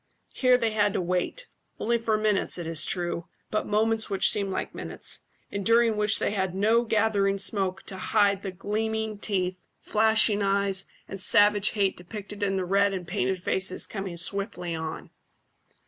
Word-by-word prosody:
Here 255 -1 +4
they 230 -2 0
had 205 -2 +2
to - - 0
wait 180 - -2 0.3
only 235 +1 +1
for 225 -1 +1
moments, 215 -3 +1
it 175 - -5
is 160 -2 +1
true, 175 -2 -2 0.2
but 215 - -1
moments 220 +2 +1
which 195 -2 +3
seemed 200 -1 -1
like 190 - -3
minutes, - - -6 0.3
and 200 0 -3
during 230 +1 +4
which 210 0 +2
they - - 0
had 190 -3 -1
no 220 +4 +3
gathering 205 -3 +2
smoke 190 -1 -1
to 190 - -7
hide 200 0 +2
the 195 - -4
gleaming 215 +2 -2
teeth, 185 -3 -1 0.2
flashing 220 -1 +3
eyes, 195 -1 0 0.2
and 195 -1 -4
savage 205 +1 +4
hate 200 -3 +1
depicted 205 +3 -8
in 195 -1 +1
the 190 -1 -1
red 200 +2 +2
and 180 -2 -6
painted 190 0 -1
faces 190 +1 -1
coming 195 -4 -5
swiftly 180 -1 -3
on. 160 -1 -5
200 Hz, 170 wpm, -27 LUFS, 190-215 Hz, 0.3 s, Here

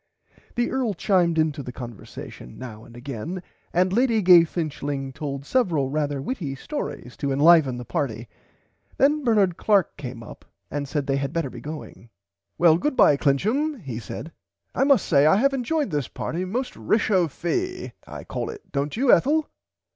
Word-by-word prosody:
The 240 0 0
Earl 250 -6 0
chimed 175 -3 +2
into 155 -2 +1
the 125 - -7
conversation 120 - -9
now 110 -4 -9
and 120 0 -14
again 140 - -6 0.3
and 185 +2 +2
Lady 230 -2 +2
Gay 175 -2 +8
Finchling 145 -5 -4
told 140 -1 -5
several 165 - +1
rarther 145 -2 -1
witty 155 - -3
stories 135 - -6
to 140 - -2
enliven 145 -2 +5
the 125 - -7
party. 125 -8 -3 0.7
Then 295 +2 +3
Bernard 205 -8 +3
Clark 200 -5 +2
came 125 -4 -7
up - - -12 0.3
and 145 -1 -3
said 145 0 -2
they 135 0 0
had 140 +1 -3
better 165 -6 -1
be - - -9
going. 145 -8 -9 0.5
Well 165 -2 +5
goodbye 255 - +4
Clincham 220 - +1
he 125 -5 -5
said 145 +7 -7 0.4
I 270 - +2
must 275 -2 +4
say 145 -2 +4
I 155 - +6
have 275 +7 +3
enjoyed 270 - -1
this 145 -5 -1
party 175 +3 -4
most 245 +8 -3
rechauffie 215 - 0 0.2
I - - -8
call - - -4
it 425 -2 -10
dont 145 +5 -2
you 255 +1 +5
Ethel. 300 +3 +3
160 Hz, 165 wpm, -24 LUFS, 140-220 Hz, 0.7 s, Gay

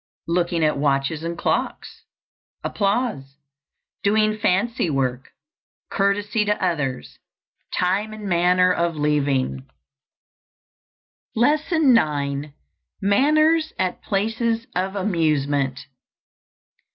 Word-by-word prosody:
_ - - - 0.2
Looking 170 -1 0
at 150 -2 +1
watches 140 +2 0
and 170 0 -4
clocks. - - -3 0.6
Applause. 200 - -1 0.6
Doing 215 +1 +2
fancy 205 -1 0
work. 130 -2 -2 0.6
Courtesy 205 +2 +1
to 210 0 0
others. 135 - -2 0.5
Time 195 +4 0
and 215 -1 -7
manner 180 +1 +3
of 170 -2 -1
leaving. 140 -3 0 1.7
LESSON 295 +3 +3
IX. 145 -5 0 0.5
MANNERS 310 +10 +3
AT 185 -1 -2
PLACES 225 +3 -1
OF 190 +2 -1
AMUSEMENT. 145 -8 0
180 Hz, 90 wpm, -22 LUFS, 145-215 Hz, 1.7 s, manner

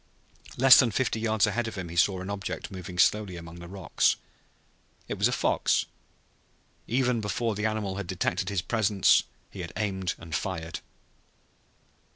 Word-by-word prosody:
Less 130 0 +9
than 125 - +4
fifty 115 0 -1
yards 110 -1 +2
ahead 115 +2 -1
of 110 - -6
him 90 -3 -5
he 85 - -8
saw 95 +2 +2
an 95 - -6
object 100 0 -5
moving 90 -1 -8
slowly 105 0 +2
among 85 0 -9
the 85 - -9
rocks. 95 -4 +1 0.9
It - - -5
was - - +4
a - - -2
fox. - - +1 1.0
Even 125 -1 +1
before 110 +2 -1
the 105 +2 -1
animal 105 -3 -3
had 100 -3 -5
detected - - -1
his 100 -4 -1
presence 105 -1 +3 0.3
he - - -10
had - - -6
aimed 95 -4 -2
and 85 -1 -10
fired. 85 -1 -3
100 Hz, 165 wpm, -27 LUFS, 90-110 Hz, 1.0 s, Less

